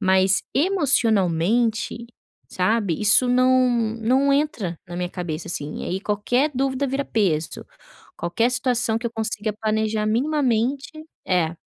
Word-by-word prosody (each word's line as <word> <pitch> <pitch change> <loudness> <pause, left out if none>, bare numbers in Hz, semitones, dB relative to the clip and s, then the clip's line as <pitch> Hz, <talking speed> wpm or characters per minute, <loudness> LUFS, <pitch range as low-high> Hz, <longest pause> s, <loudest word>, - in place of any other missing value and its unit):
mas 190 0 +3
emocionalmente, 230 - +1 0.4
sabe, 190 -2 0
isso 210 +4 +5
não 255 0 +3 0.3
não 260 +5 +2
entra 240 - -1
na 175 - -7
minha 180 0 -2
cabeça, 170 -3 -5
assim, 150 -3 -5
aí 185 +2 -3
qualquer 230 +8 0
dúvida 270 +1 -1
vira 270 +2 -2
peso, 170 -8 -1 0.5
qualquer 175 +8 0
situação 245 -2 0
que 235 - -4
eu 235 - -5
consiga 220 -1 -2
planejar 215 0 0
minimamente 260 +1 0 0.4
é. 170 -3 0
225 Hz, 125 wpm, -22 LUFS, 190-255 Hz, 0.5 s, isso